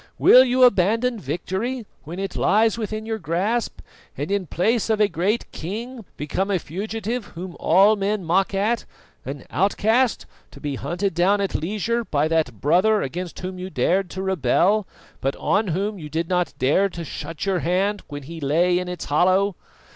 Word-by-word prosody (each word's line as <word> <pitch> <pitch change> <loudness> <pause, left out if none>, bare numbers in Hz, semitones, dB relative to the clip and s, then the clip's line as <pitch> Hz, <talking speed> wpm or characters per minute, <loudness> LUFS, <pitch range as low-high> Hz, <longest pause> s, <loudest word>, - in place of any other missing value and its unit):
Will 255 - +8
you 255 0 +3
abandon 230 +2 +3
victory 190 - -3 0.2
when 165 +4 -7
it 195 0 -4
lies 220 +1 +3
within 215 -1 -4
your 225 0 -3
grasp, 195 +7 -1 0.4
and 145 +7 -3
in 200 -3 0
place 225 +8 0
of 220 -1 +2
a 210 - +5
great 190 +6 -1
king 225 +7 -6
become 170 +7 -2
a 195 - +2
fugitive 215 +7 -4
whom 175 +1 -7
all 195 +6 +5
men 200 -1 -1
mock 185 +4 +2
at, 215 +4 0 0.4
an 135 0 -6
outcast 220 +5 +2 0.2
to - - -14
be 145 -2 -3
hunted 180 +8 -2
down 185 +5 +3
at 200 -1 -1
leisure 215 +7 -1
by 150 -7 0
that 155 -9 0
brother 195 +8 +3
against 175 +6 -5
whom 185 0 -5
you 185 +1 -5
dared 190 0 +1
to 190 +2 -5
rebel, 190 - +2 0.3
but 135 +1 -1
on 210 +1 +1
whom 195 +4 -2
you 150 -2 -8
did 160 +2 -2
not 180 -1 0
dare 150 +10 +2
to 170 -2 -7
shut 165 +2 -6
your 190 -2 +1
hand 190 +5 0
when 145 -1 -7
he 165 +4 -8
lay 175 +6 +2
in 180 - -4
its 180 - -5
hollow? 185 +6 +2
190 Hz, 175 wpm, -23 LUFS, 170-215 Hz, 0.4 s, Will